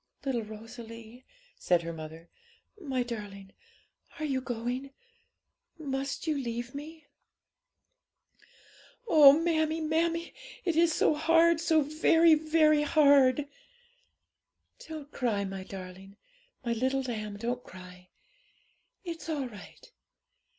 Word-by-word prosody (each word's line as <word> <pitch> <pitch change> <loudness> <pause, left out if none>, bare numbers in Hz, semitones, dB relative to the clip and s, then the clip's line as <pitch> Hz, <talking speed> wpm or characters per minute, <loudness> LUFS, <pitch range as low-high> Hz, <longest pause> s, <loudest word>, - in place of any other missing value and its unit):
'Little 255 -4 0
Rosalie,' 230 +2 -11 0.3
said 175 -1 +2
her 170 0 -5
mother, 160 +1 -9 0.5
'my 265 -6 -1
darling, 205 -5 -8 0.6
are 310 - -3
you 270 -3 -1
going? 245 +2 -4 0.9
must 275 -2 -4
you 310 -2 0
leave 240 -2 -4
me?' 305 +2 -9 2.0
'Oh, 290 -8 +8
mammie, 320 -1 0
mammie! 330 +2 -1 0.3
it 340 -3 0
is 335 0 +4
so 310 - +2
hard! 330 +2 +4
so 320 -2 +3
very, 320 +2 +4
very 310 -1 +3
hard!' 285 -2 +4 1.4
'Don't 305 -2 -8
cry, 215 -6 -1
my 195 0 -6
darling! 190 +1 -10 0.5
my 235 - 0
little 260 +3 0
lamb, 215 -5 -5
don't 245 +3 -3
cry! 180 0 -13 0.9
It's 335 -2 -7
all 285 -5 -2
right. 210 -4 -14
265 Hz, 110 wpm, -29 LUFS, 220-310 Hz, 2.0 s, Oh